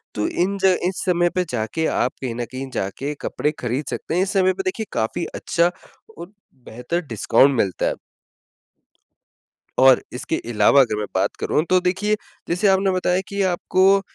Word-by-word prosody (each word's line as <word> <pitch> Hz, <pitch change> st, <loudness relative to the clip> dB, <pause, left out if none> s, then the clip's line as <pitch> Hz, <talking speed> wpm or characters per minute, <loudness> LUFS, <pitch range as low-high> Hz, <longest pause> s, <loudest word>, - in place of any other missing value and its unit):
तो 105 Hz, -, 0 dB
इन 195 Hz, +3 st, -1 dB
ज 190 Hz, -1 st, +5 dB
इस 185 Hz, -, -3 dB
समय 175 Hz, -1 st, +2 dB
पे 180 Hz, -, +2 dB
जाके 120 Hz, +7 st, -2 dB
आप 125 Hz, -, 0 dB
कहीं 130 Hz, -3 st, -3 dB
न 120 Hz, -, -3 dB
कहीं 130 Hz, +1 st, -6 dB
जाके, 135 Hz, +10 st, -3 dB
कपड़े 150 Hz, -, -1 dB
खरीद 125 Hz, +4 st, -2 dB
सकते -, -, -4 dB
हैं। 180 Hz, -, +2 dB
इस 195 Hz, -, -3 dB
समय 185 Hz, -1 st, +3 dB
पे -, -, -4 dB
देखिए 365 Hz, -, -2 dB
काफ़ी 110 Hz, +9 st, -1 dB
अच्छा 170 Hz, +1 st, +1 dB, 0.5 s
और 175 Hz, +3 st, -9 dB, 0.4 s
बेहतर 125 Hz, +10 st, -3 dB
डिस्काउंट 130 Hz, +4 st, +3 dB
मिलता 95 Hz, -4 st, 0 dB
है। -, -, 0 dB, 1.9 s
और 130 Hz, 0 st, +6 dB
इसके 125 Hz, +6 st, -3 dB, 0.2 s
अलावा 105 Hz, +6 st, +5 dB
अगर 115 Hz, -4 st, +1 dB
मैं 105 Hz, -, -2 dB
बात -, -, 0 dB
करूँ 150 Hz, -, +1 dB
तो 185 Hz, 0 st, +5 dB
देखिए, 190 Hz, +4 st, +1 dB, 0.3 s
जैसे 180 Hz, +4 st, +1 dB
आपने 195 Hz, 0 st, +3 dB
बताया 185 Hz, 0 st, +1 dB
कि 200 Hz, 0 st, -3 dB
आपको 190 Hz, +2 st, +3 dB
170 Hz, 175 wpm, -21 LUFS, 125-185 Hz, 1.9 s, और